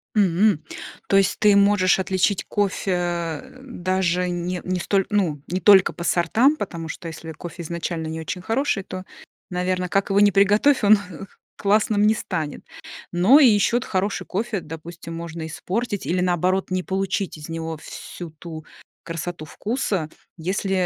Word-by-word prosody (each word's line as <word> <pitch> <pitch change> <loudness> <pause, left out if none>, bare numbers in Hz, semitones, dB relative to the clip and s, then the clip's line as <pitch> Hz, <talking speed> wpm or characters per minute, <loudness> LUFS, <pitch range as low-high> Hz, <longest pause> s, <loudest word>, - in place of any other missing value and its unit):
М! 195 -2 +3 0.5
То 195 - +5
есть 195 - +2
ты 205 -1 +5
можешь 200 -2 +4
отличить 190 +1 +1
кофе, 175 -5 -1 0.2
даже 185 -6 -1
не 175 0 -3
не 185 0 -2
столь 195 +1 +1
ну, 175 -9 0
не 185 +1 -2
только 195 -2 +6
по 170 - -7
сортам, 225 - +3
потому 170 - -5
что 165 - -7
если 160 0 -8
кофе 170 +2 -8
изначально 165 -1 -4
не 160 0 -4
очень 180 +3 -5
хороший, 225 -1 0
то, 185 0 -7 0.5
наверно, 180 0 -1
как 195 +1 +1
его 200 +1 +3
ни 205 -1 +6
приготовь, 210 +8 +4
он 210 +1 +7 0.6
классным 205 +1 +2
не 220 - +5
станет. 160 -8 -4 0.5
Но 195 +12 +6
и 270 - +8
ещё 215 +2 +3
от 250 - -3
хороший 195 +1 -1
кофе, 210 -1 -2
допустим, 165 +1 -9
можно 165 -1 -6
испортить 200 +6 -3
или, 180 +1 0
наоборот, 185 +2 +1
не 185 -1 0
получить 195 -2 -2
из 150 +2 -10
него 165 -1 -4
всю 170 +2 -9
ту 160 0 -9 0.4
красоту 165 -1 -5
вкуса, 200 - -2 0.3
если, 190 +4 -2
185 Hz, 155 wpm, -23 LUFS, 170-200 Hz, 0.6 s, и